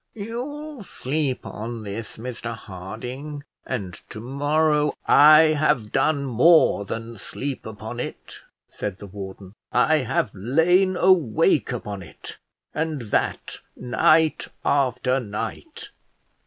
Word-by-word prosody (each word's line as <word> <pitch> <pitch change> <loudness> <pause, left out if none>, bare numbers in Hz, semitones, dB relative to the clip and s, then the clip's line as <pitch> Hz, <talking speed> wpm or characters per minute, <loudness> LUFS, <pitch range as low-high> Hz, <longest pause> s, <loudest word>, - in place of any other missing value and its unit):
"You'll 260 +6 -6
sleep 145 -6 -2
on 115 +1 -6
this, 105 +2 -6
Mr 115 0 -5
Harding, 125 +10 -7 0.2
and 100 -8 -3 0.2
to - - -8
morrow 150 +4 +1
" - - -43 0.3
"I 155 0 +7
have 145 -8 +1
done 145 -3 +1
more 130 -3 +4
than 115 +3 -6
sleep 135 +8 -5
upon 110 +2 -7
it," - - -6 0.3
said 100 -2 -5
the 100 - -10
warden; 95 -1 -9 0.2
"I 155 +6 +4
have 125 -6 0
lain 170 - +2
awake 170 - +3
upon 100 -2 -5
it, 85 - -11 0.3
and 160 -1 -2
that - - -1 0.2
night 155 +6 +2 0.2
after 130 -1 +2
night. 120 - -6
130 Hz, 115 wpm, -24 LUFS, 110-155 Hz, 0.3 s, I